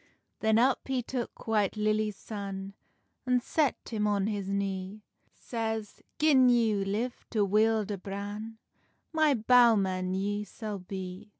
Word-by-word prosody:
Then 220 0 +3
up 250 +2 +2
he 260 -2 -1
took 245 0 -5
White 215 -2 +1
Lilly's 215 0 +1
son, 195 -1 -6 0.5
An 250 0 +4
set 290 +3 +1
him 210 -2 0
on 200 -2 +1
his 205 -2 -2
knee; 195 +1 -3 0.3
Says—"Gin 235 +4 +1
ye 225 -4 +3
live 215 +6 -3
to 210 -3 +1
wield 215 +1 +2
a 200 - -3
bran, 205 +3 -6 0.6
My 310 -3 +4
bowman 210 -6 +4
ye 205 +2 -1
sall 210 0 -6
bee." 185 +2 -7
215 Hz, 130 wpm, -29 LUFS, 200-230 Hz, 0.6 s, An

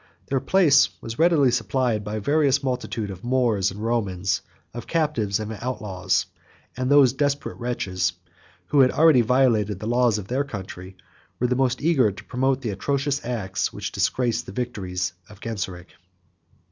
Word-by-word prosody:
Their 135 - +1
place 155 -1 +4
was 115 +3 -7
readily 160 -6 +4
supplied 120 -2 0
by 105 +1 -4
a - - -2
various 140 +3 +2
multitude 125 -5 -3
of 95 +3 -10
Moors 120 -6 +1
and 95 - -9
Romans, 100 -6 -1 0.3
of 120 - -7
captives 135 -12 0
and 110 +1 -4
outlaws; 105 -7 -1 0.5
and 130 +1 -2
those 140 -3 +6
desperate 145 -1 -1
wretches, 95 -7 -1 0.6
who 145 - +3
had 130 -1 +6
already 155 -4 +5
violated 115 -4 +2
the 105 - -6
laws 120 -1 +2
of 100 -2 -6
their 130 +5 0
country, 95 -6 -8 0.4
were 125 - +1
the 125 +1 +1
most 130 0 0
eager 135 -10 +3
to 100 - -11
promote 130 +1 0
the 115 - -2
atrocious 140 +7 -1
acts 105 -6 -2
which - - -5
disgrace 120 -2 0
the - - -10
victories 95 -6 -3 0.2
of 105 -2 -14
Genseric. 95 -5 -5
120 Hz, 160 wpm, -24 LUFS, 100-135 Hz, 0.6 s, those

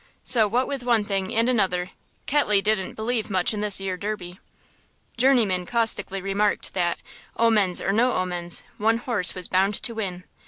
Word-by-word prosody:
So 225 -4 +3
what 245 +5 0
with 275 -2 -4
one 235 -3 +2
thing 195 -2 -2
and 230 +1 +2
another 185 -7 0 0.3
Ketley 255 -8 +2
didn't 195 -2 -1
believe 220 0 -2
much 185 +1 +1
in 210 - -3
this 210 -2 +3
'ere 190 -1 -3
Derby. 185 -3 -6 0.8
Journeyman 230 -8 +2
caustically 225 -5 0
remarked 200 +1 -1
that, 175 -2 0 0.4
omens 215 -6 +3
or 195 - -1
no 240 +5 +2
omens, 175 -2 -1 0.2
one 225 +2 +2
horse 230 -7 0
was 185 -1 -1
bound 195 +2 +1
to 235 - 0
win. 190 -5 -5
205 Hz, 165 wpm, -24 LUFS, 185-230 Hz, 0.8 s, So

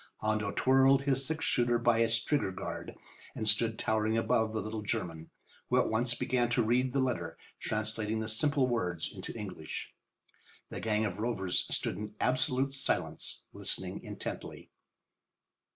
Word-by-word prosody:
Hondo 110 -1 -1
twirled 135 +2 +4
his 135 -1 +1
six 160 +3 0
shooter 120 -1 +2
by 120 -1 +3
its 115 0 +2
trigger 145 -9 +1
guard 95 - -6 0.4
and 110 - -3
stood 110 0 +5
towering 110 0 +1
above 110 -1 +2
the 110 - -2
little 110 0 -4
German, 80 -6 -3 0.4
who - - +3
at - - +3
once 120 +2 +2
began 120 0 +1
to 120 0 +2
read 125 +3 +2
the 135 - 0
letter, 130 -2 -1 0.2
translating 110 0 -1
the 110 - -3
simple 140 +5 +2
words 90 -9 -2
into - - -7
English. 95 -7 -6 0.8
The - - -5
gang 110 0 +1
of 100 -1 -4
rovers 100 -6 0
stood - - -1
in 105 0 -6
absolute 130 +1 +1
silence, 135 - -1
listening - - -2
intently. - - -7
115 Hz, 150 wpm, -31 LUFS, 110-130 Hz, 0.8 s, stood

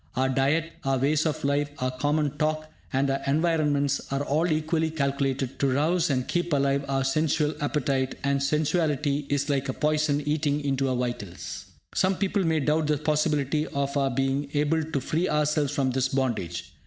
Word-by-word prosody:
Our 130 +1 +1
diet, 145 +5 +1
our 135 0 +1
ways 145 +4 +2
of 155 - -3
life, 145 +1 +1
our 130 0 -1
common 145 +2 0
talk, 155 0 -1 0.2
and 135 +1 +1
our 135 0 -1
environments 145 -2 +1
are 140 +1 0
all 155 +5 +1
equally 160 +1 0
calculated 140 -3 -1
to 140 - +2
rouse 160 +5 +2
and 130 -3 0
keep 175 -2 -1
alive 140 0 +2
our 135 -1 +1
sensual 150 +2 +1
appetite; 135 -2 0
and 140 0 +1
sensuality 150 -1 0
is 145 0 0
like 140 -2 0
a - - 0
poison, 150 0 +1
eating 150 -1 +1
into 135 -1 +1
our 130 - 0
vitals. 100 -8 -4 0.3
Some 190 0 +2
people 195 +1 0
may 160 -2 +1
doubt 150 +2 +1
the 150 -1 +2
possibility 150 0 0
of 140 0 -2
our 135 -1 +2
being 135 +2 -1
able 150 +2 +2
to 155 -2 -2
free 160 +7 -1
ourselves 150 -1 +1
from 140 -3 0
this 130 +1 +1
bondage. 115 -11 -2
145 Hz, 180 wpm, -26 LUFS, 135-155 Hz, 0.3 s, ways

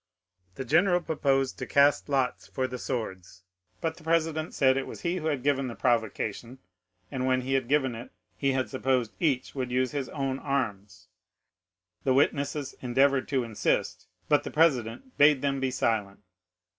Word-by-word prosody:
The 135 - -5
general 175 +7 +3
proposed 135 -5 0
to - - -4
cast 140 +1 +3
lots 135 -3 0
for 130 - -2
the 125 -1 -6
swords, 95 -8 -5 0.4
but 160 -1 -2
the 165 - -15
president 160 -1 0
said 130 -2 +4
it 135 - -2
was - - -9
he 175 +1 -1
who 160 -3 -3
had 145 -5 -1
given 135 -2 +1
the 120 - -6
provocation, 115 0 -1 0.5
and 130 -2 -2
when 130 0 +2
he 130 +2 -3
had 135 -3 +1
given 135 -2 +2
it 115 +2 -8 0.3
he 135 -1 0
had 130 -1 0
supposed 130 -3 0
each 140 -7 0
would 130 -2 -3
use 125 0 0
his 140 -3 -3
own 135 -2 -2
arms. 100 -9 -3 1.0
The 130 - +2
witnesses 140 0 0
endeavored 130 +2 +2
to 135 -3 0
insist, 115 -3 -1 0.2
but 145 -1 +4
the - - -5
president 155 - 0
bade 145 -1 +5
them 140 -1 0
be 135 0 0
silent. 105 -5 -1
135 Hz, 170 wpm, -28 LUFS, 125-145 Hz, 1.0 s, bade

